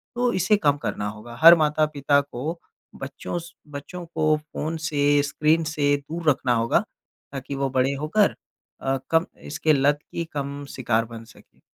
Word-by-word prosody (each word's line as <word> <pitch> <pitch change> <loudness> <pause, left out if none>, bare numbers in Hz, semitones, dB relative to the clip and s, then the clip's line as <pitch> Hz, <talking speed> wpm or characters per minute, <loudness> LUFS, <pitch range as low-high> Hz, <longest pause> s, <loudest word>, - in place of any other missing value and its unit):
तो 245 0 +1
इसे 190 +3 +3
कम 145 -6 +2
करना 105 -7 -3
होगा। 110 +3 -10
हर 165 +1 +11
माता-पिता 150 -2 +2
को 145 +5 -5 0.4
बच्चों 140 +5 -5
स 170 0 -11 0.2
बच्चों 175 +5 -7
को 155 -2 +1
फ़ोन 155 +2 -5
से 145 -1 +3
स्क्रीन 155 +3 +1
से 145 -2 +1
दूर 155 +3 -2
रखना 125 -3 +2
होगा, 115 0 +2 0.5
ताकि 135 0 -6
वो 135 0 -1
बड़े 135 +2 +2
होकर 200 +7 +2 0.5
अ, 135 0 0
कम 165 +1 +4 0.2
इसके 155 +1 +1
लत 145 +1 +2
की 170 - -3
कम 140 0 -4
शिकार 115 -3 0
बन 115 0 -10
सके। 110 - -20
145 Hz, 165 wpm, -24 LUFS, 135-160 Hz, 0.5 s, हर